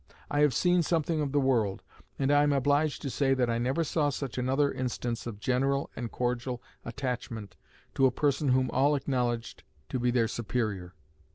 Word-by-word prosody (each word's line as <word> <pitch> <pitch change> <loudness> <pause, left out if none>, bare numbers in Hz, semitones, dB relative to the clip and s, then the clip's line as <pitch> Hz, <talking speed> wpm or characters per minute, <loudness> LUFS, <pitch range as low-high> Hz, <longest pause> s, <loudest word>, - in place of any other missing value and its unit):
I 145 - +1
have 145 -4 +4
seen 180 -1 +3
something 165 -1 0
of 145 -2 -1
the 145 - +2
world 115 -8 +1 0.3
and 135 0 +1
I 145 0 +5
am 145 0 +3
obliged 145 +2 +1
to 140 - -2
say 135 0 +2
that 125 -2 +1
I 115 - 0
never 130 +7 0
saw 150 -2 +1
such 135 -2 -4
another 135 +3 +2
instance 125 -2 -3
of 105 -4 -6
general 135 +4 0
and 120 -2 -5
cordial 125 0 -2 0.2
attachment 115 -5 -5 0.4
to 135 - +4
a - - +1
person 145 +2 0
whom 130 0 +2
all 140 +3 +3
acknowledged 125 -4 -2 0.3
to 130 -2 -2
be 125 0 +1
their 120 -2 +2
superior. 105 -6 -3
130 Hz, 185 wpm, -29 LUFS, 120-145 Hz, 0.4 s, I